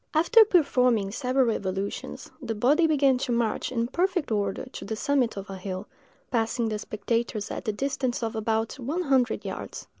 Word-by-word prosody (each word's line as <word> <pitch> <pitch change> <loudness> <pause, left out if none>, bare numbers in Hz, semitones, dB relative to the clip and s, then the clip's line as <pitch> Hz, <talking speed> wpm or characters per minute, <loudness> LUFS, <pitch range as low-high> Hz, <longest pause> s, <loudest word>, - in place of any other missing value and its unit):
After 395 +9 +7
performing 250 - +3
several 255 +2 +1
evolutions, 195 -1 -4
the 230 -4 -3
body 290 +10 +4
began 275 -4 +3
to 255 - -2
march 235 -1 0
in 235 -2 0
perfect 355 +2 0
order 200 0 -1
to 255 - -9
the 220 - -4
summit 260 -2 +1
of 195 0 -6
a 195 - -7
hill, 185 +1 -5 0.5
passing 230 0 0
the 215 -1 -2
spectators 220 0 -2
at - - -5
the 215 - +1
distance 255 +1 -2
of 225 -1 -2
about 220 +3 -1
one 300 +9 -2
hundred 265 -5 +1
yards. - - -6
235 Hz, 175 wpm, -26 LUFS, 215-275 Hz, 0.5 s, After